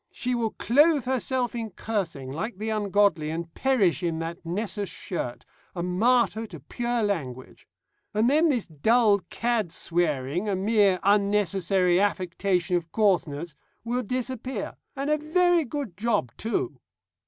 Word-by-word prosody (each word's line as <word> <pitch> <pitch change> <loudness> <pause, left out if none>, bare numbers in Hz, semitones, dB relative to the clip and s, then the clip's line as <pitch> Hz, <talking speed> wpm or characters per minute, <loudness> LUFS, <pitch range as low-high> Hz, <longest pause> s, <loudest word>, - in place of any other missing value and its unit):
She 250 0 -2
will 235 -2 0
clothe 290 +5 +3
herself 255 -1 0
in 230 -2 -4
cursing, 180 -11 -4
like 185 - -4
the 215 +2 -3
ungodly, 200 -6 +2
and 165 +1 -5
perish 200 - +2
in 170 -2 -1
that 165 +1 -5
Nessus 200 +3 -3
shirt, 165 -8 -5 0.3
a 175 - -2
martyr 225 +4 +2
to 170 -6 -10
pure 240 - -2
language. 135 -11 -4 0.4
And 215 +2 +2
then 310 +5 +4
this 245 -7 0
dull 205 - +3
cad 230 -7 -1
swearing 165 +1 -1
a 200 - +1
mere 200 -1 +3
unnecessary 195 -3 +2
affectation 185 -2 0
of 165 -1 -6
coarseness 170 -7 0 0.3
will 240 +2 -1
disappear. 255 +2 -4 0.2
And 280 +2 -2
a 305 - +2
very 345 +2 +3
good 270 - -5
job 205 - 0
too. 350 - -2
205 Hz, 140 wpm, -26 LUFS, 175-240 Hz, 0.4 s, then